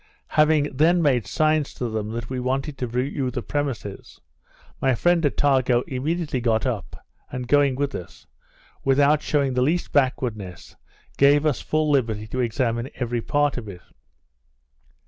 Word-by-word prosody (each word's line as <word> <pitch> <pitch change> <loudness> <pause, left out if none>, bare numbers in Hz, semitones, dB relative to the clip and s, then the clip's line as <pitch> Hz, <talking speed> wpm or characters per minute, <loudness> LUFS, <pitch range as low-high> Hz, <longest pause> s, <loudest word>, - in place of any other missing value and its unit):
Having 150 -3 +2
then 170 +4 +4
made 125 -8 +2
signs 155 +3 +1
to 125 - -3
them 110 -2 -3
that 120 0 -4
we 130 -1 -4
wanted 135 +3 -2
to 125 - -2
view 130 +2 -2
the 125 - -4
premises, 135 -9 -4 0.6
my 135 -2 +2
friend 175 +6 +2
Attago 130 -4 +2
immediately 145 +1 -2
got 115 -1 +1
up, 115 -7 -4 0.3
and 125 -1 -5
going 145 -1 +3
with 140 +1 -2
us, 85 - -9 0.6
without 140 +2 +3
showing 140 -4 0
the 125 - +1
least 160 +7 0
backwardness, 115 -9 -1 0.4
gave 145 +2 +5
us 150 -5 +1
full 155 -1 0
liberty 115 -6 0
to 130 - -4
examine 120 +1 -1
every 120 -2 -2
part 145 +2 +1
of 115 -3 -6
it. 90 -2 -10
130 Hz, 150 wpm, -23 LUFS, 120-145 Hz, 0.6 s, gave